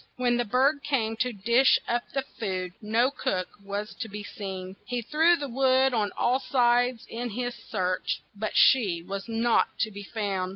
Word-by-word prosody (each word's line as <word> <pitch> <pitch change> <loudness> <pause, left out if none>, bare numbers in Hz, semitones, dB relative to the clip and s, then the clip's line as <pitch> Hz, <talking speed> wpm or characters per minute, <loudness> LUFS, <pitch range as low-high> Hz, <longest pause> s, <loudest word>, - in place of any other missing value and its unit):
When 245 -1 +1
the 240 - 0
bird 270 +6 +2
came 230 -7 0
to 250 +1 0
dish 235 +5 +4
up 240 0 0
the 270 0 -1
food, 185 -8 -4
no 230 +5 +2
cook 185 -9 -2
was 200 +1 -4
to 225 - -4
be 205 +1 -7
seen. 190 -2 -7
He 245 -1 -2
threw 320 +8 +4
the 290 -4 -4
wood 265 +1 +3
on 215 -3 +1
all 250 +2 +2
sides 245 -2 +2
in 240 +1 -4
his 245 +3 -3 0.2
search, 185 -3 -1
but 215 +1 -3
she 195 -10 +4
was 195 +2 -5
not 230 +1 +1
to 220 - 0
be 205 0 -8
found. 200 -3 -3
230 Hz, 180 wpm, -27 LUFS, 200-250 Hz, 0.2 s, dish